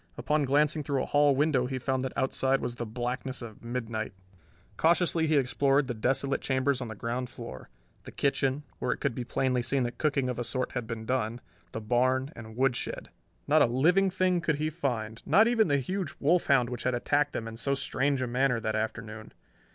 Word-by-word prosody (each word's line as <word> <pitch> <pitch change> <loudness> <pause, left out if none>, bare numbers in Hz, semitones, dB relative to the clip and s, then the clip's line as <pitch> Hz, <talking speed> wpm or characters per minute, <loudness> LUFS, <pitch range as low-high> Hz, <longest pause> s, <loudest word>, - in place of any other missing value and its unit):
Upon 150 -1 +1
glancing 150 +3 +2
through 140 -2 -1
a - - -3
hall 145 -1 +3
window 140 -3 +2
he 130 0 -3
found 130 +1 -1
that 130 0 -4
outside 135 0 +1
was 120 0 -4
the 120 - -4
blackness 125 +3 -4
of 110 -1 -10
midnight. 115 -3 -4 0.6
Cautiously 170 -1 +2
he 155 -1 +3
explored 135 +1 +2
the 125 - -3
desolate 135 +4 0
chambers 130 0 +1
on 125 - -4
the 110 - -7
ground 120 +3 -3
floor: 65 - -9 0.4
the - - -8
kitchen 135 0 0 0.2
where - - 0
it - - -1
could 140 - -1
be 125 - -4
plainly 125 0 0
seen 130 +2 0
that 120 0 -4
cooking 140 -4 +1
of 125 -1 -3
a - - -1
sort 125 +2 -2
had 125 -3 -4
been 115 -1 -5
done 120 -2 -1 0.3
the - - -4
barn, 130 +5 +1
and 110 -1 -10
woodshed. 130 -1 -1 0.4
Not - - +5
a - - +6
living 175 +11 +3
thing 185 -1 +1
could 155 -2 +1
he 155 +2 -2
find, 115 -8 -3
not 220 +3 +5
even 230 -3 +3
the 140 -2 +2
huge 185 +5 -3
wolf 170 +5 +2
hound 125 -3 +3
which 125 - -4
had 125 -1 0
attacked 145 +4 +1
them 115 - -4
in 115 - -7
so 140 +4 0
strange 135 0 0
a - - -2
manner 125 0 +1
that 110 -1 -2
afternoon. 110 0 -4
130 Hz, 210 wpm, -29 LUFS, 120-145 Hz, 0.6 s, a